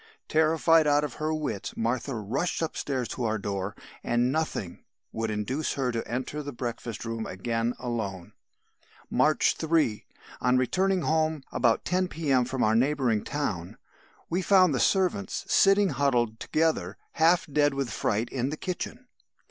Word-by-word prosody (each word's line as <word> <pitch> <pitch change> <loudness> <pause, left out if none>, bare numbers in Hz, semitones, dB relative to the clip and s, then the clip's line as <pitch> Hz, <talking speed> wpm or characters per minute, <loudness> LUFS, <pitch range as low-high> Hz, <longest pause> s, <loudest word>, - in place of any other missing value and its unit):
"Terrified 160 0 +4
out 145 0 +3
of 145 -4 -3
her 155 +1 0
wits 155 -10 -3
Martha 120 +3 -1
rushed 130 - -2
upstairs 135 -5 -2
to 125 - -4
our 110 -1 0
door, 100 -1 -3 0.3
and 120 +1 +1
nothing 155 - -2 0.3
would 115 0 -2
induce 115 +8 -2
her 130 -3 -1
to 115 -1 -3
enter 130 +5 -3
the 145 -1 -6
breakfast 120 -2 -5
room 115 -1 -3
again 115 +5 -2
alone. 105 -8 -4 0.8
"March 155 0 +3
3. 160 -9 +1 0.3
On 125 +1 +3
returning 185 +8 +1
home 155 -2 +1
about 115 -2 +2
10 185 0 +1
P.M. 140 -8 +1
from 130 +1 -1
a 110 +1 +3
neighbouring 125 -4 +2
town, 100 - -3 0.5
we 180 +3 -1
found 185 -4 +5
the 130 - 0
servants 195 +1 +1
sitting 195 0 +4
huddled 125 -5 +1
together, 155 - 0
half 165 +2 +3
dead 145 -1 +2
with 135 -4 -2
fright 110 +3 0
in 130 0 -2
the 155 - -4
kitchen. 215 +8 -5
135 Hz, 150 wpm, -27 LUFS, 115-160 Hz, 0.8 s, found